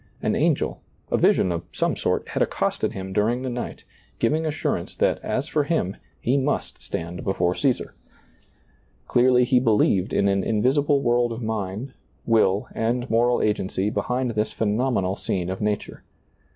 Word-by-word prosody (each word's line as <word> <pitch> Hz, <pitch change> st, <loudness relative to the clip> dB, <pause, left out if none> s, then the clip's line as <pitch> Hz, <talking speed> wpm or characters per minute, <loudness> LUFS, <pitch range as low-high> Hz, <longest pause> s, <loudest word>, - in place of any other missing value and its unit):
An -, -, +1 dB
angel, -, -, +1 dB, 0.3 s
a -, -, +3 dB
vision 90 Hz, -, +3 dB
of 85 Hz, -1 st, -2 dB
some -, -, 0 dB
sort, -, -, -1 dB
had -, -, -2 dB
accosted -, -, 0 dB
him 95 Hz, 0 st, -6 dB
during 115 Hz, +5 st, +1 dB
the 130 Hz, -, -2 dB
night, 120 Hz, 0 st, -5 dB, 0.3 s
giving 160 Hz, +1 st, +1 dB
assurance 155 Hz, 0 st, -2 dB
that, -, -, +1 dB
as 135 Hz, +4 st, -1 dB
for 150 Hz, -1 st, +1 dB
him, 140 Hz, -, 0 dB, 0.2 s
he 130 Hz, +4 st, +1 dB
must 140 Hz, +2 st, -1 dB
stand 85 Hz, +1 st, -5 dB
before 90 Hz, -2 st, +1 dB
Caesar. 130 Hz, +4 st, 0 dB, 1.1 s
Clearly 125 Hz, 0 st, +4 dB
he 125 Hz, 0 st, +4 dB
believed 105 Hz, -5 st, +2 dB
in 100 Hz, -, +2 dB
an 100 Hz, -1 st, +1 dB
invisible 140 Hz, +6 st, +2 dB
world 120 Hz, 0 st, +2 dB
of 115 Hz, +1 st, -5 dB
mind, 110 Hz, +3 st, -3 dB, 0.3 s
will 105 Hz, -3 st, +3 dB
and 120 Hz, +2 st, -1 dB
moral 120 Hz, +2 st, +3 dB
agency 100 Hz, -1 st, 0 dB
behind 125 Hz, +5 st, -1 dB
this 110 Hz, -1 st, -1 dB
phenomenal 105 Hz, -3 st, 0 dB
scene 90 Hz, -1 st, -2 dB
of 95 Hz, -, -5 dB
nature. 105 Hz, -1 st, -2 dB
115 Hz, 155 wpm, -24 LUFS, 100-125 Hz, 1.1 s, Clearly